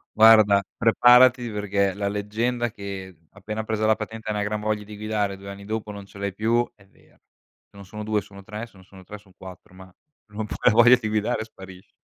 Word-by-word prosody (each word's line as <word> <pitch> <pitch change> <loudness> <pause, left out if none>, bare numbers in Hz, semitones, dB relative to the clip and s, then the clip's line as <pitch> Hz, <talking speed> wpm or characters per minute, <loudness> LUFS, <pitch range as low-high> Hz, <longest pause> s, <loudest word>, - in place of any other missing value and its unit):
Guarda, 110 -2 +6 0.2
preparati 120 +1 +5
perché 100 -2 -1
la 100 0 -3
leggenda 110 +4 -2
che 95 -4 -8
appena 105 +2 -6
presa 110 0 -2
la 110 - +4
patente 110 0 -7
hai 105 - -1
una 105 - -1
gran 105 +1 -2
voglia 105 -1 -2
di 105 - -10
guidare, 105 -2 -2
2 100 +1 -11
anni 100 0 -10
dopo 110 0 -4
non 100 -1 -9
ce 100 - -16
l'hai 100 -1 -3
più, 115 +4 0
è 100 - -22
vera. - - -27
Se - - -38
non 100 -1 -12
sono 105 +3 -8
2 105 -1 0
sono 100 -1 -14
3, 105 +3 -7
se 120 - -20
non 95 - -17
sono 95 -1 -16
3 105 +3 -10
son 100 -2 -22
4, 95 -1 -13
ma 95 0 -13 0.4
non 105 +1 -5
puoi - - -7
la - - +6
voglia 120 +3 +7
di 110 - -4
guidare 110 +2 -1
sparisce. 95 -4 -14
105 Hz, 225 wpm, -24 LUFS, 100-110 Hz, 0.4 s, voglia